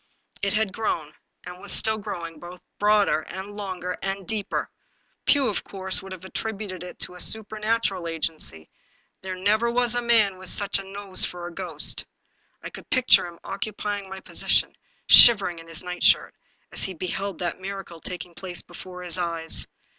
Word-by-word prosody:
It 200 0 +1
had 215 -3 0
grown, 160 -9 -2 0.3
and 180 +1 -10
still 220 0 +2
was 210 - -10
growing, 170 -6 -6
both 175 +2 -10 0.2
broader, 205 -7 +3
and 195 +2 -7
longer, 185 -3 -4
and 195 -1 -4
deeper. 215 -3 -2 0.6
Pugh, 280 -3 +4
of 205 - -2
course, 190 -1 0
would 190 - -11
have 185 -1 -8
attributed 200 -2 -4
it 180 - -8
to 180 - -4
supernatural 215 -3 0
agency; 155 - -3 0.5
there 185 -1 -5
never 210 +5 +2
was 240 0 +1
a 245 - 0
man 220 -5 +3
with 185 -1 -3
such 200 -1 +1
a - - -6
nose 195 0 +1
for 175 -1 -4
a 175 - -7
ghost. - - -2 0.6
I - - -6
could - - -11
picture 255 -8 +5
him 170 -1 -11
occupying 205 -1 -4
my 190 0 -7
posi - - -5
tion, - - +4 0.3
shivering 200 -7 +9
in 165 - -13
his 165 +1 -3
nightshirt, 180 0 +2 0.4
as - - -2
he 190 - -5
beheld 185 +2 -3
that 175 0 -3
miracle 190 -4 -7
taking 180 -1 -7
place 180 0 -5
before 180 -1 -10
his 180 0 -5
eyes. 165 -2 +2
190 Hz, 170 wpm, -25 LUFS, 180-210 Hz, 0.6 s, shivering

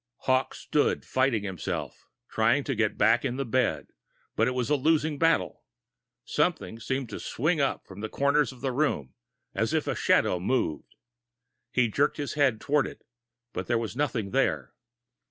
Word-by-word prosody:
Hawkes 130 0 +1
stood 150 - 0
fighting 130 -5 +1
himself, 95 -4 -5 0.2
trying 115 +6 +2
to 135 - -2
get 110 -3 0
back 115 +3 +4
in 120 - -1
the 135 - -2
bed, 125 +1 0 0.5
but - - +2
it 125 - -1
was 125 +2 -1
a - - +5
losing 150 +1 +1
battle. 165 0 +1 0.6
Something 115 - -1
seemed 130 +2 -2
to - - -6
swing 155 +4 0
up 135 - -1
in 95 - -10
the 110 +1 -4
corner 140 +4 +2
of 130 -4 -4
the 135 -1 -1
room, 125 - -1 0.4
as - - 0
if - - +1
a - - -1
shadow 90 - +2
moved. 90 - -1 0.8
He 125 -2 +3
jerked 140 +7 +1
his 145 -1 -3
head 140 -7 +2
toward 145 0 +1
it, - - -11 0.5
but - - -4
there 120 - +2
was 115 -1 -4
nothing 125 -8 -1
there. 135 0 0
130 Hz, 175 wpm, -27 LUFS, 115-145 Hz, 0.8 s, a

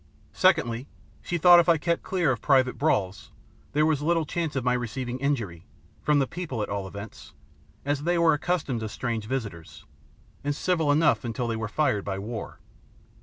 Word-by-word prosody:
Secondly, 140 -9 +2 0.3
she 175 - -2
thought 175 +2 +8
if 170 0 +3
I 165 - +5
kept 170 +2 -1
clear 175 -7 0
of 120 - -3
private 130 -3 +3
brawls 100 - 0 0.4
there 150 +1 +3
was 155 -2 +1
little 165 +1 +1
chance 165 -1 -3
of 135 - -1
my 125 0 +2
receiving 125 +1 -3
injury, 110 - -2 0.3
from 150 -1 +2
the 140 - +3
people 135 -8 -4
at - - -5
all 100 -1 -3
events, 100 +2 -10 0.5
as 145 0 0
they 175 +3 +1
were 170 -1 +4
accustomed 150 -5 -1
to 110 -1 -4
strange 115 -1 -3
visitors, 105 -10 -6 0.6
and 145 0 -1
civil 160 -2 +1
enough 150 0 +3
until 120 0 -3
they 115 - -1
were 110 0 -3
fired 105 -4 0
by 95 -1 -3
war. 110 +3 -6
135 Hz, 180 wpm, -26 LUFS, 115-160 Hz, 0.6 s, thought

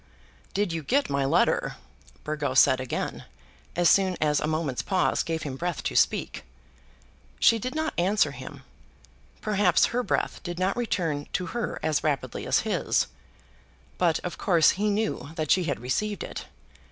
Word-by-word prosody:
"Did 200 -4 0
you 165 - -2
get 270 - +1
my 140 -1 +1
letter?" 135 - +2 0.5
Burgo 150 -3 -2
said 130 -1 +6
again, 130 - -4 0.5
as 175 0 +3
soon 190 -1 +4
as 150 -1 +2
a - - -1
moment's 155 -5 -1
pause 190 -2 +1
gave 165 -1 -3
him 135 -3 -5
breath 175 +1 -3
to - - -3
speak. - - +1 1.0
She 230 - +5
did 255 +6 -4
not 315 0 -1
answer 195 +4 +2
him. - - -10 0.8
Perhaps 205 -5 +3
her 245 - +2
breath - - -1
did 175 -2 -5
not 185 +2 0
return 170 -11 -1
to 180 - -1
her 235 -2 -3
as 155 -2 +1
rapidly 145 -4 -2
as - - +3
his. - - +1 0.9
But, 170 -3 +3
of 180 - -6
course, 170 -5 +4
he 210 +3 0
knew 210 -8 -1
that 155 -3 -1
she 185 -2 +4
had 140 - -2
received 205 - -2
it. - - -7
175 Hz, 165 wpm, -26 LUFS, 150-205 Hz, 1.0 s, said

